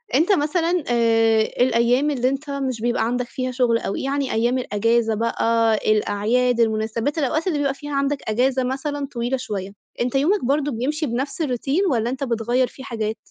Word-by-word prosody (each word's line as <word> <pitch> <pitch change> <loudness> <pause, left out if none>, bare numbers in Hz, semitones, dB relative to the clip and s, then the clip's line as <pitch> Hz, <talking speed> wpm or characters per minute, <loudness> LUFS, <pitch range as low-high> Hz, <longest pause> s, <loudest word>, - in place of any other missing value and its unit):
أنت 330 +8 +3
مثلًا 335 +1 +1
آآ 225 -2 +3
الأيام 245 +5 +2
اللي 255 -2 +1
أنت 275 +2 -4
مش 265 -5 -3
بيبقى 240 -1 +1
عندك 245 +1 -1
فيها 255 -1 -3
شغل، 240 -2 +2
أوي 195 - -3
يعني 275 0 -1
أيام 240 +3 +1
الإجازة 230 0 +1
بقى، 230 0 +1 0.2
الأعياد، 230 +4 +1
المناسبات، 225 +5 0
الأوقات 310 +4 0
اللي 315 -5 +1
بيبقى 280 -1 +1
فيها 290 +1 -8
عندك 280 +1 +1
إجازة 255 +3 +1
مثلًا 280 +2 -3
طويلة 240 +2 -1
شوية، 200 -5 -5 0.3
أنت 250 +2 -1
يومك 320 +4 +2
برضه 290 +2 +1
بيمشي 295 +7 -2
بنفْس 270 +6 -3
الRoutine، 285 - 0
والّا 235 -1 0
أنت 265 +2 -3
بتغيَّر 240 +1 0
فيه 265 - -12
حاجات؟ 220 -3 -3
250 Hz, 170 wpm, -22 LUFS, 230-280 Hz, 0.3 s, أنت